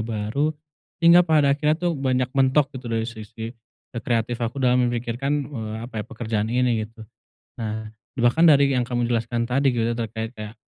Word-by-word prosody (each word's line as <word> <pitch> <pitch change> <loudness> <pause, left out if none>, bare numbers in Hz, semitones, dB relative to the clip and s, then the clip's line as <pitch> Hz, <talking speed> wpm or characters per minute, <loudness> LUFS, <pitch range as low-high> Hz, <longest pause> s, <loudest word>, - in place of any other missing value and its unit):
baru, 110 +7 -1 0.5
hingga 170 +1 +7
pada 150 -4 +4
akhirnya 150 +2 +1
tuh 175 +1 -1
banyak 130 -2 0
mentok 135 +1 +2
gitu 125 -1 -8
dari 115 0 0
sisi 110 0 -8 0.4
e 115 - -6
kreatif 115 0 -1
aku 120 +4 -3
dalam 125 0 +3
memikirkan, 120 +3 -2 0.2
eee, 110 -5 -5
apa 115 -3 -5
ya, - - -12
pekerjaan 110 -3 -3
ini 120 -2 +1
gitu. 110 0 -14 0.6
Nah, 110 -1 -4 0.3
bahkan 120 +8 +4
dari 140 -3 +5
yang 125 - +1
kamu 120 -1 -1
jelaskan 115 0 -1
tadi 135 0 +2
gitu 115 0 0
terkait 110 -1 -4
kayak, 105 0 -7
120 Hz, 175 wpm, -23 LUFS, 115-135 Hz, 0.6 s, hingga